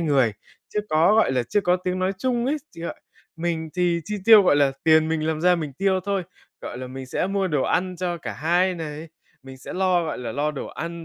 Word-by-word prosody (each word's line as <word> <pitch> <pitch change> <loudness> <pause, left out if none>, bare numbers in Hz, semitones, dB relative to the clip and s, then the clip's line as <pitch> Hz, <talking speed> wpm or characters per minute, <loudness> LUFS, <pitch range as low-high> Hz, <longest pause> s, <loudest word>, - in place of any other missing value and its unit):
người. 140 -9 +2 0.4
Chưa 210 - +2
có, 165 +7 +4
gọi 220 -11 +3
là, 125 -2 +1
chưa 205 - 0
có 180 -1 +2
tiếng 180 0 -3
nói 185 +1 0
chung 245 0 0
ấy, 295 +3 +1 0.2
chưa 170 0 -5 0.4
mình 165 -1 -2
thì 175 -1 +1
chi 210 - -4
tiêu, 220 -2 +9
gọi 160 -6 +4
là, 140 -2 +3
tiền 160 0 +5
mình 160 -1 -1
làm 160 -1 -1
ra 180 +1 +4
mình 155 -4 -4
tiêu 190 +5 +1
thôi, 200 -2 -1 0.4
gọi 120 - -7
là, 130 - -6
mình 130 +1 -8
sẽ 180 - -1
mua 195 -1 0
đồ 150 -4 +1
ăn 180 0 0
cho 175 -1 -2
cả 165 - -6
hai 175 +4 +1
này, 160 -1 -6 0.3
mình 135 0 -11
sẽ - - -8
lo, 185 -2 +2
gọi 155 - -4
là, 125 - -5
lo 145 +2 0
đồ 150 - -6
ăn, 170 0 -6
170 Hz, 240 wpm, -23 LUFS, 150-185 Hz, 0.4 s, tiêu